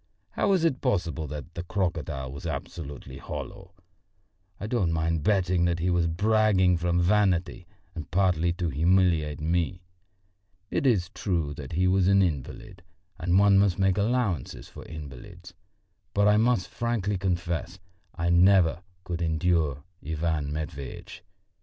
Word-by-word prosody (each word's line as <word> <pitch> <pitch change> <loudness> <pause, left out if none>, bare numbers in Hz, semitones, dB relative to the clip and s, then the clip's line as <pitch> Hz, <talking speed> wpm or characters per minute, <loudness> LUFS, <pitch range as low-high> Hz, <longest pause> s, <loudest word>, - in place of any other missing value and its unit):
How - - 0
was 190 -4 +3
it 135 -6 0
possible 85 - -1
that 75 +3 -8
the 85 - -4
crocodile 85 -8 -3
was 85 +6 -7
absolutely 70 -3 -7
hollow? 95 - -8 0.8
I - - -5
don't 105 -7 0
mind 80 0 0
betting 90 -1 +2
that 85 -1 +1
he 90 +2 0
was 85 -1 +2
bragging 100 0 +3
from 85 +1 0
vanity 90 -2 +1 0.3
and 80 -4 -7
partly 85 -2 +2
to 85 -1 -2
humiliate 80 -1 +2
me. 85 +2 -1 0.9
It 140 - +1
is 95 -7 +1
true 85 -7 -2
that 70 +1 -8
he 90 +3 +2
was 95 0 +3
an 100 0 +5
invalid 90 - -4 0.4
and 90 +2 +2
one 100 0 +5
must 100 -3 +2
make 95 0 +2
allowances 105 - -1
for - - -11
invalids; 80 +4 -10 0.6
but 100 0 +4
I 105 - +5
must 115 -2 +2
frankly 105 -5 -2
confess, 85 -1 -2 0.4
I 85 +1 0
never 90 -1 +4 0.2
could 85 -2 -4
endure 80 -4 0 0.2
Ivan 80 -1 -2
Matveitch. 75 +2 -6
85 Hz, 140 wpm, -27 LUFS, 80-95 Hz, 0.9 s, an